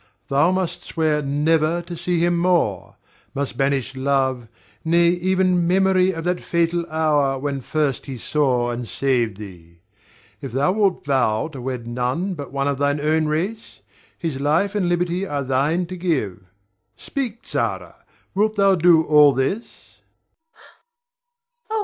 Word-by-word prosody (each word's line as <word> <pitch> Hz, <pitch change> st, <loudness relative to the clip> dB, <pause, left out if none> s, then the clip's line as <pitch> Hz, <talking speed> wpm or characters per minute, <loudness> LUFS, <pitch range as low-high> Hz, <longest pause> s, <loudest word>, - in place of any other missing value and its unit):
Thou 145 Hz, +4 st, +3 dB
must 185 Hz, -2 st, -2 dB
swear 155 Hz, -2 st, 0 dB
never 155 Hz, +3 st, +1 dB
to 170 Hz, 0 st, -7 dB
see 175 Hz, +1 st, -1 dB
him 175 Hz, 0 st, +1 dB
more; 170 Hz, -, 0 dB, 0.4 s
must 140 Hz, 0 st, -3 dB
banish 135 Hz, -1 st, -1 dB
love, 130 Hz, -2 st, 0 dB, 0.4 s
nay, 170 Hz, +1 st, +4 dB
even 180 Hz, 0 st, +1 dB
memory 190 Hz, 0 st, +3 dB
of 165 Hz, -2 st, -6 dB
that 180 Hz, +1 st, -1 dB
fatal 170 Hz, 0 st, 0 dB
hour 150 Hz, -4 st, +1 dB
when 140 Hz, 0 st, -3 dB
first 145 Hz, -1 st, -1 dB
he 135 Hz, -2 st, -6 dB
saw 125 Hz, -3 st, 0 dB
and 120 Hz, 0 st, -5 dB
saved 120 Hz, -7 st, 0 dB
thee. 85 Hz, -5 st, -12 dB, 0.6 s
If 135 Hz, -4 st, -7 dB
thou 140 Hz, +6 st, +2 dB
wilt 200 Hz, -2 st, 0 dB
vow 130 Hz, -2 st, +1 dB
to 140 Hz, -5 st, -9 dB
wed 125 Hz, -2 st, -4 dB
none 125 Hz, +11 st, -2 dB
but 145 Hz, -5 st, -8 dB
one 140 Hz, 0 st, -1 dB
of 140 Hz, -1 st, -1 dB
thine 145 Hz, +1 st, +1 dB
own 155 Hz, +1 st, +1 dB
race, 185 Hz, +9 st, -3 dB, 0.4 s
his 160 Hz, -6 st, -4 dB
life 160 Hz, +8 st, +1 dB
and 195 Hz, -4 st, 0 dB
liberty 175 Hz, +2 st, 0 dB
are 145 Hz, -3 st, -2 dB
thine 140 Hz, +7 st, 0 dB
to 185 Hz, +2 st, -7 dB
give. 140 Hz, -, -2 dB, 0.5 s
Speak, 240 Hz, -, -5 dB
Zara! -, -, -3 dB, 0.4 s
Wilt 215 Hz, +2 st, +1 dB
thou 195 Hz, -1 st, +4 dB
do 170 Hz, -2 st, +5 dB
all 150 Hz, -2 st, +6 dB
this? 135 Hz, -, -4 dB, 1.7 s
Zara. 440 Hz, 0 st, -2 dB
155 Hz, 150 wpm, -21 LUFS, 135-175 Hz, 1.7 s, all